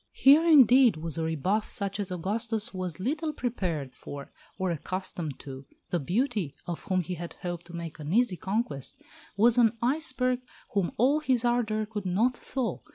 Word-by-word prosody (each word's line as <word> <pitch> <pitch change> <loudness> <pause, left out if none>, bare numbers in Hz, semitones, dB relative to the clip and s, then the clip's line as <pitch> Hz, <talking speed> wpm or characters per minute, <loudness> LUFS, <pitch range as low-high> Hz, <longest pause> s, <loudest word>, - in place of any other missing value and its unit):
Here 285 +4 +6
indeed 260 - +7
was 165 0 -3
a - - 0
rebuff 180 +7 0
such 200 0 -1
as 200 -2 -3
Augustus 215 +5 -2
was 185 -3 -4
little 305 - -1
prepared 175 - -3
for, 140 +1 -9 0.3
or 190 -2 0
accustomed 170 -2 -4
to. 135 -1 -9 0.2
The 175 - +1
beauty, 190 - -1
of 170 -2 -5
whom 185 -1 +1
he 180 - -4
had 170 0 -6
hoped 175 -1 -4
to 170 - -9
make 165 -1 -6
an 150 +1 -5
easy 225 -1 +3
conquest, 190 - -3 0.4
was 235 +3 +5
an 230 -1 +4
iceberg 255 -1 +1 0.3
whom 195 -4 +1
all 270 +6 +4
his 255 -5 +1
ardour 220 -3 +1
could 210 -3 -5
not 225 +8 +2
thaw. 255 -1 -3
200 Hz, 170 wpm, -28 LUFS, 170-245 Hz, 0.4 s, indeed